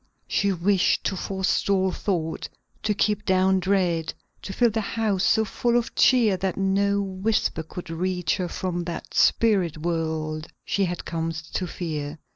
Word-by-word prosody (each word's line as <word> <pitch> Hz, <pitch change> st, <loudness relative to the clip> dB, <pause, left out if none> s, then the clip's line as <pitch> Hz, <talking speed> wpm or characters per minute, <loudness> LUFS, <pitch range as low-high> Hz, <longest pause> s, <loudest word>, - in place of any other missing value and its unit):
She 200 Hz, 0 st, +1 dB
wished 185 Hz, +1 st, +2 dB
to -, -, -1 dB
forestall 190 Hz, 0 st, 0 dB
thought; 170 Hz, -5 st, -2 dB, 0.3 s
to 210 Hz, -1 st, 0 dB
keep 210 Hz, +1 st, +1 dB
down 190 Hz, -1 st, +3 dB
dread; 180 Hz, -4 st, 0 dB, 0.3 s
to -, -, -6 dB
fill 235 Hz, +4 st, +3 dB
the 220 Hz, +1 st, -1 dB
house 205 Hz, -2 st, -1 dB
so 220 Hz, +2 st, +3 dB
full 240 Hz, +3 st, +1 dB
of 235 Hz, -, -2 dB
cheer 230 Hz, -7 st, +4 dB
that 190 Hz, 0 st, -2 dB
no 200 Hz, +1 st, +2 dB
whisper 190 Hz, -3 st, -1 dB
should 175 Hz, -2 st, -7 dB
reach 180 Hz, +1 st, -1 dB
her 180 Hz, -2 st, -2 dB
from 175 Hz, -1 st, -3 dB
that 170 Hz, -1 st, -6 dB
spirit 195 Hz, -9 st, +3 dB
world 160 Hz, -1 st, -2 dB, 0.2 s
she 200 Hz, -, +1 dB
had 175 Hz, -1 st, -4 dB
come 165 Hz, 0 st, -2 dB, 0.2 s
to 185 Hz, -, -1 dB
fear. 155 Hz, -4 st, -4 dB
185 Hz, 155 wpm, -25 LUFS, 170-200 Hz, 0.3 s, cheer